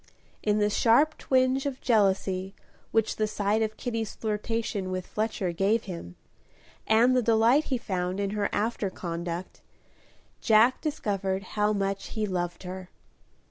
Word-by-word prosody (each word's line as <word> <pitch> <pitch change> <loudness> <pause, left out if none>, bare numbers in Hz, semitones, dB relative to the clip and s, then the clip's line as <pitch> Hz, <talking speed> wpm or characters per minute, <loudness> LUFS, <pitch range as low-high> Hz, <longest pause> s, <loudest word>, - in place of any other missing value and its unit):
In 210 0 +1
the 210 0 +2
sharp 265 +9 +4
twinge 260 +1 +2
of 270 -2 -4
jealousy 195 -4 +1 0.3
which 225 -1 +1
the 215 - +1
sight 210 +1 0
of 220 -1 -1
Kitty's 230 -4 -3
flirtation 215 -2 -2
with 185 -1 -3
Fletcher 215 -4 -2
gave 200 +6 +1
him, 170 - -8 0.7
and 235 +4 +5
the 250 - +4
delight 230 +6 +4
he 260 - -1
found 185 -4 -2
in 200 -1 -1
her 205 -1 -1
after 210 -1 -1
conduct, 170 0 -5 0.8
Jack 225 +3 +4
discovered 200 - -2
how 210 0 +2
much 195 -1 -2
he 215 -1 -2
loved 175 -2 -3
her. 185 0 -7
210 Hz, 140 wpm, -27 LUFS, 190-230 Hz, 0.8 s, and